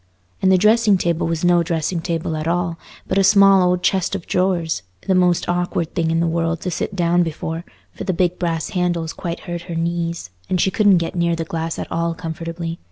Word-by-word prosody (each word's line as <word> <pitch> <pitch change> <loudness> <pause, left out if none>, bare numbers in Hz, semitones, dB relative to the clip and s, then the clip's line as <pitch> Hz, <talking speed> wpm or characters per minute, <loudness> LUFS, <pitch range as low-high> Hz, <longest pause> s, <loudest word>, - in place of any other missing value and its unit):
And 190 - +4
the 190 - +6
dressing 215 +1 +4
table 170 -2 0
was 165 +1 -1
no 175 -1 +4
dressing 165 +1 -1
table 165 -2 -2
at 155 +1 -3
all, 170 -1 -1 0.3
but 190 - +1
a - - +4
small 195 -1 +6
old 180 0 +1
chest 190 0 +1
of 190 - -5
drawers, 180 - 0 0.2
the 190 - +2
most 180 -2 +2
awkward 175 -2 -1
thing 165 -3 0
in 165 0 +1
the 170 - +2
world 165 0 0
to 180 - -3
sit 190 - -3
down 175 -1 +2
before, 165 0 -3 0.3
for - - -7
the 190 - 0
big 180 0 0
brass 165 -2 -1
handles 175 -3 -1
quite 170 -1 -5
hurt 175 -1 -5
her 170 - -3
knees, 170 - -2 0.2
and 185 - +1
she 190 - +2
couldn't 205 -2 +4
get 170 0 -2
near 170 -1 +1
the 165 0 -3
glass 165 0 -3
at - - -6
all 170 0 -1
comfortably. 165 0 -5
170 Hz, 220 wpm, -20 LUFS, 165-180 Hz, 0.3 s, the